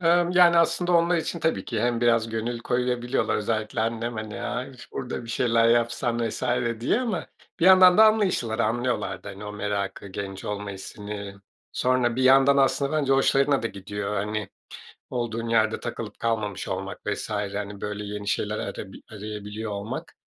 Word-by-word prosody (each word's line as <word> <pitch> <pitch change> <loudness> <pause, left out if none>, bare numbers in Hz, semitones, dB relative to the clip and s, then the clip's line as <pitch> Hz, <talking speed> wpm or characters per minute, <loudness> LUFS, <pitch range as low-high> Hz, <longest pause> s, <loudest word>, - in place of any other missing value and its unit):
Emm, 175 0 +3
yani, 175 -1 +6
aslında 170 +2 +2
onlar 170 +1 +4
için 170 +1 -2
tabii 160 - 0
ki 115 -3 -3
hem 120 0 +1
biraz 115 -1 +3
gönül 115 +2 -3
koyabiliyorlar. 125 0 0
Özellikle 110 0 -2
annem, 115 +1 -2
hani, 110 -1 -6
aaa, 125 +1 -3
"İş 130 -3 -14
burada 125 -2 -4
bir 115 - -7
şeyler 115 -1 +3
yapsan." 120 0 +1
vs. - - -7 0.4
diye 130 - +1
ama 240 -4 -2 0.3
bir - - +3
yandan 185 0 +8
da 220 - +10
anlayışlılar, 195 - +2
anlıyorlar 120 +3 -1
da, - - -6
hani, 100 +1 -8
o 105 - -6
merakı, 100 -1 -3
genç 95 0 -6
olma 105 0 -4
hissini. 100 +1 -7 0.4
Sonra 125 -2 +1
bir 130 - +1
yandan 135 +1 +6
aslında 140 +1 +2
bence 145 -3 +2
hoşlarına 135 0 +3
da - - 0
gidiyor. 100 0 -5
Hani, 105 0 -2 0.6
olduğun 115 -2 -3
yerde 110 -1 +2
takılıp - - -6
kalmamış 105 -4 -2
olmak - - -4
vs. - - -3
hani, 105 -1 -3
böyle, 105 0 -4
yeni 105 0 -5
şeyler 105 +1 -1
arabi 95 -2 -6
arayabiliyor 105 +1 -6
olmak. 100 +1 -5
115 Hz, 170 wpm, -25 LUFS, 105-135 Hz, 0.6 s, da